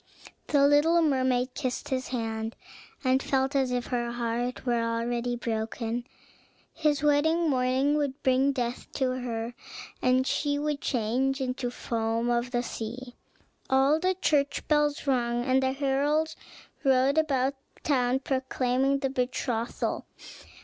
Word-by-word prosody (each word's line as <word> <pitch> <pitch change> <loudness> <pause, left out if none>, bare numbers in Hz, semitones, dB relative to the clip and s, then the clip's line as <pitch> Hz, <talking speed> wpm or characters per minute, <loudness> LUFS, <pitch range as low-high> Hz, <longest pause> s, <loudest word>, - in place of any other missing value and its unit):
The 280 -2 +4
little 300 +4 +4
mermaid 255 -3 +1
kissed 255 -3 -3
his 260 -1 -1
hand, 225 -2 -3 0.5
and 260 0 +3
felt 270 +1 0
as 265 -2 +2
if 245 -1 -1
her 240 -1 -2
heart 240 +1 -2
were 240 -2 +1
already 235 +1 -1
broken. 230 +1 -3 0.7
His 300 -3 +1
wedding 315 +3 +3
morning 260 +3 +2
would 285 -1 -2
bring 265 +2 +3
death 245 -2 -3
to 260 -2 0
her, 235 -1 -4 0.5
and 255 +1 +3
she 285 +1 0
would 295 0 -2
change 255 +3 0
into 255 -1 -2
the - - -4
foam 230 0 -1
of 240 +1 0
the 240 -1 -1
sea. 245 +2 -6 0.6
All 270 +4 +4
the 370 +2 +1
church 290 -5 0
bells 295 -1 +2
rung, 240 -3 +1
and 260 0 +3
the 260 0 +1
heralds 290 +4 0 0.5
rode 270 +2 +4
about 275 -3 +1 0.2
the - - -24
town 260 -2 +1
proclaiming 260 0 0
the 270 -1 -1
betrothal. 245 -2 -2
260 Hz, 140 wpm, -28 LUFS, 240-280 Hz, 0.7 s, The